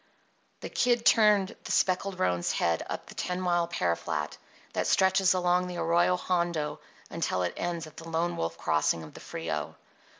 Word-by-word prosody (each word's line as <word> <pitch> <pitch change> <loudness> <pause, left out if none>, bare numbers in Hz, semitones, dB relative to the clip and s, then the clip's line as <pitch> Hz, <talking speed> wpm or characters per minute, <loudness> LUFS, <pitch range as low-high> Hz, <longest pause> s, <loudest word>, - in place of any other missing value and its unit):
The - - -5
Kid 240 -1 +1
turned 210 -2 +5
the - - -5
speckled 185 +1 +1
roan's 90 -1 0
head 85 -1 +1
up - - -4
the - - -12
ten 180 0 -3
mile 175 -2 +1
pear 90 - 0
flat 75 -2 -3 0.4
that - - 0
stretches 190 0 +4
along 180 0 +2
the 180 -1 -6
Arroyo 170 +2 +3
Hondo 170 -4 -1 0.3
until 90 - -1
it 90 - -1
ends 170 -1 -3
at 155 - -14
the 165 0 -8
Lone 170 +2 0
Wolf 80 0 -3
Crossing 80 +1 +1
of 80 - -11
the - - -10
Frio. - - -4
175 Hz, 175 wpm, -29 LUFS, 145-185 Hz, 0.4 s, turned